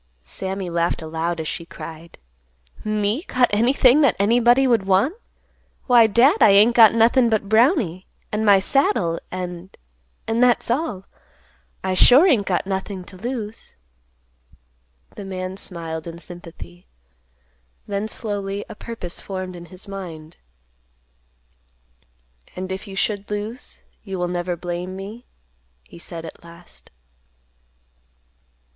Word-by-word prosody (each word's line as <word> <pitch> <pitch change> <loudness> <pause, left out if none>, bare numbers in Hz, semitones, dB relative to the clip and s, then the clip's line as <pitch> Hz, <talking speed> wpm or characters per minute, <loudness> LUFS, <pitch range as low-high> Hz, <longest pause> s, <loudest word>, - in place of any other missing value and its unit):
Sammy 190 - -5
laughed 170 -1 -1
aloud, 165 +2 -3
as 160 - -4
she 170 - -4
cried, 165 0 -11 0.7
"Me 215 +4 0
got 255 -8 +2
anything 250 +5 +4
that 280 -7 +4
anybody 240 +5 +4
would 230 -6 +2
want? 195 - +3 0.7
Why, 240 -3 +6
Dad, 250 - +4
I - - +8
ain't 210 +4 +6
got 225 -2 +7
nothin' 235 +2 +4
but 215 -2 0
Brownie, 220 - +2 0.2
and 210 +1 -1
my 205 -2 +6
saddle, 190 - +1
and—and 175 - -7
that's 245 -1 +3
all. 240 - -2 0.8
I 190 - -1
sure 250 - +7
ain't 245 - +3
got 180 -1 0
nothing 190 0 -4
to 185 - -12
lose." 225 0 -6 1.4
The 205 - -7
man 185 -1 -5
smiled 165 -4 -2
in 170 0 -7
sympathy. 165 - -12 1.0
Then 200 +1 -3
slowly 205 -2 -4
a - - -9
purpose 210 -6 -7
formed 185 -2 -6
in 175 0 -10
his 185 +3 -10
mind. 170 -5 -9 2.2
"And 185 +1 -5
if 190 +3 -5
you 195 - -8
should 205 0 -2
lose, 210 +4 -5 0.2
you 195 -3 -6
will 180 0 -1
never 175 0 -2
blame 175 +2 -5
me?" 205 +5 -9 0.6
he 65 - -15
said 165 -1 -8
at 160 - -11
last. 170 +1 -14
195 Hz, 125 wpm, -22 LUFS, 175-225 Hz, 2.2 s, I